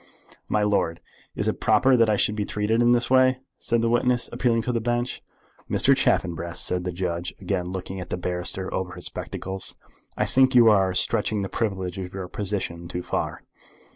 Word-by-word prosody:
"My 105 - +2
lord, 95 -5 +1 0.4
is - - -1
it - - -1
proper 125 +5 +4
that 115 -2 +4
I 105 - +3
should 105 +1 +1
be 105 - -1
treated 105 +3 0
in 120 0 +4
this 120 +1 +2
way?" 130 0 +5 0.2
said 115 -1 +1
the - - +2
witness, 120 +1 +1
appealing 115 -2 +1
to 125 - -1
the 115 -2 -1
Bench. 120 +1 -2 0.5
"Mr. - - +4
Chaffanbrass," 85 -1 0
said 90 0 +1
the 90 - -1
judge, 85 -1 -3
again 90 -2 -2
looking 95 +1 -5
at 90 -1 -7
the - - -2
barrister 90 +1 -4
over 90 -1 -3
his - - -8
spectacles, 95 0 -4 0.4
"I - - +1
think 130 0 +3
you 115 -2 +8
are 95 -3 +2
stretching 105 +2 +1
the 95 - -4
privilege 95 -4 -2
of 95 0 -6
your 95 -2 -5
position 95 -4 -3
too 90 +1 -4
far." - - -3
100 Hz, 195 wpm, -25 LUFS, 90-115 Hz, 0.5 s, you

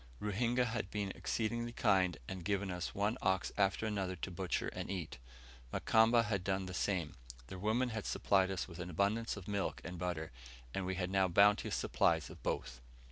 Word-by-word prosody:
Ruhinga 120 +4 +1
had 115 -5 -2
been 100 -2 -2
exceedingly 120 +3 -2
kind, 95 -7 +3
and 95 -2 -5
given 100 +1 0
us 90 0 -4
one 105 +5 0
ox 95 0 +1
after 100 +1 +2
another 95 -4 -1
to 90 - -5
butcher 90 0 -1
and - - -6
eat. 90 -9 -4 0.5
Mukamba 115 +1 +4
had 100 -3 -1
done 95 0 0
the 95 - -6
same. 90 -5 -1 0.4
Their 95 - -7
women 110 +6 +1
had 110 -2 -4
supplied 95 -1 +3
us 95 -3 -2
with 85 -1 -10
an 90 0 -4
abundance 100 +6 0
of 95 - -9
milk 100 -2 -1
and 90 +1 -6
butter, 85 -3 -3 0.4
and 95 -1 -2
we 95 - -1
had 90 0 -2
now 95 -1 +4
bounteous 100 +3 +4
supplies - - +2
of - - -12
both. - - -3
95 Hz, 190 wpm, -35 LUFS, 90-105 Hz, 0.5 s, Mukamba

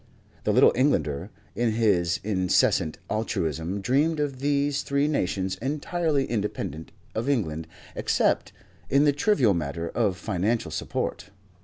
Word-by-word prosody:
The - - +3
Little - - +6
Englander, 85 - +1 0.2
in 115 -2 0
his 100 -7 +2
insensate 95 -5 +2
altruism, 90 -3 -2
dreamed 145 +8 +2
of 140 -3 -2
these 140 0 +1
three 140 +1 +1
nations 95 -9 -1
entirely 150 +1 0
independent 100 - -3 0.2
of 115 +5 -2
England, 80 - -1 0.3
except - - +1 0.4
in 140 +1 +4
the 145 -1 +4
trivial 140 - +3
matter 85 0 -3
of 100 -6 0
financial 105 +4 -1
support. - - -3
110 Hz, 125 wpm, -26 LUFS, 90-140 Hz, 0.4 s, Little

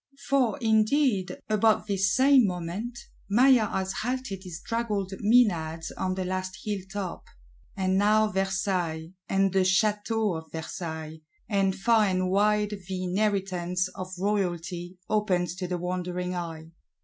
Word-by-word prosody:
For, 270 -2 +2
indeed, 220 -1 +2
about 215 0 +3
this 195 -2 +1
same 265 -3 +6
moment, 180 +7 -4 0.3
Maillard 245 0 +5
has 190 0 -2
halted 250 -5 -3
his 175 -3 -7
draggled 215 -5 -2
Menads 175 -8 +2
on 185 0 -1
the 185 -1 -2
last 185 0 -3
hill 205 -2 -1
top; 195 -3 -5 0.5
and 190 0 +1
now 215 +1 +4
Versailles, 190 -4 -1 0.2
and 195 -1 +2
the 195 - +3
Château 210 0 +1
of 160 - -22
Versailles, 160 -1 -6 0.3
and 195 -2 +1
far 225 +1 +3
and 185 -1 0
wide 210 +1 +2
the 185 -1 -3
inheritance 185 -2 0
of 185 0 -7
Royalty 180 -2 -2
opens 185 -5 +1
to 185 -1 -3
the 180 0 -2
wondering 180 0 -3
eye. 165 -2 -6
190 Hz, 135 wpm, -27 LUFS, 180-215 Hz, 0.5 s, same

